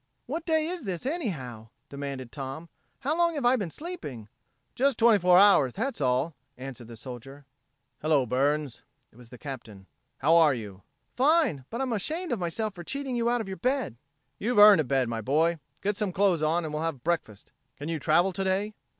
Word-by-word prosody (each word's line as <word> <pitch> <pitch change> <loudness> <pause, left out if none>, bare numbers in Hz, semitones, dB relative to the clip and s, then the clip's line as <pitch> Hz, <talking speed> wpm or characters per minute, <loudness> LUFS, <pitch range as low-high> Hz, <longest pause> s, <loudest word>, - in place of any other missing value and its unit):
"What 335 +1 -5
day 315 -1 +2
is 345 -1 -4
this, 185 -1 -4
anyhow!" 150 - -4 0.2
demanded 140 -3 -6
Tom. 140 +4 -7 0.3
"How 285 +4 0
long 340 -1 +2
have 280 -4 -2
I 245 +2 +5
been 200 -8 -2
sleeping?" 160 - -7 0.4
"Just 270 -1 +1
twenty 225 -2 +5
four 180 0 +5
hours, 190 -11 +5
that's 270 - -3
all," 130 +5 +1 0.2
answered 130 -2 -8
the 115 -1 -10
soldier. 135 +4 -10 0.6
"Hello, 150 -4 +2
Burns." 140 +2 0 0.3
It - - -22
was 120 -2 -14
the 125 - -11
Captain. 115 -8 -9 0.3
"How 155 +5 +3
are 155 -5 +5
you?" 105 -4 -8 0.3
"Fine! 265 - +2
But 235 +3 -4
I'm 260 -3 -1
ashamed 315 - -3
of 240 - -1
myself 205 +5 -2
for 175 -2 -9
cheating 270 +5 -4
you 235 0 +1
out 240 -1 +1
of 215 - -6
your 190 0 -5
bed." 255 - -1 0.4
"You've 240 +3 -1
earned 205 -4 +9
a - - -3
bed, 130 -1 +1
my 115 -1 -3
boy. 160 +7 +1 0.2
Get 205 +1 0
some 210 -2 -1
clothes 185 -3 +2
on 160 +2 +1
and 155 - -5
we'll 150 - -2
have 160 -6 -3
breakfast. 160 -12 -3 0.3
Can 145 - -6
you 165 -1 -2
travel 170 +6 +3
today?" 195 +3 -1
170 Hz, 195 wpm, -27 LUFS, -, 0.6 s, earned